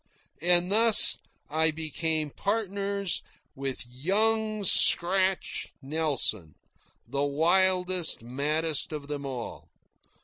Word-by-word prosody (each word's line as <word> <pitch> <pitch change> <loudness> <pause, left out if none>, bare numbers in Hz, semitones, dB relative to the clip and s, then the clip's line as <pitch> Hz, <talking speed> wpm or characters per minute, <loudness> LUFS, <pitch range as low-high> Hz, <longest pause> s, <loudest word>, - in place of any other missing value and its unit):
And 175 +2 +2
thus 225 +1 +7 0.3
I 160 +2 +1
became 155 -1 -2
partners 200 -1 -2 0.3
with 135 -2 -6
"Young 215 - -1
Scratch" 190 +1 +2
Nelson, 135 - -2 0.5
the 140 +4 -3
wildest, 180 +2 0
maddest 150 +6 -1
of 150 -2 -7
them 145 -1 -6
all. 125 -3 -8
160 Hz, 90 wpm, -26 LUFS, 140-190 Hz, 0.5 s, thus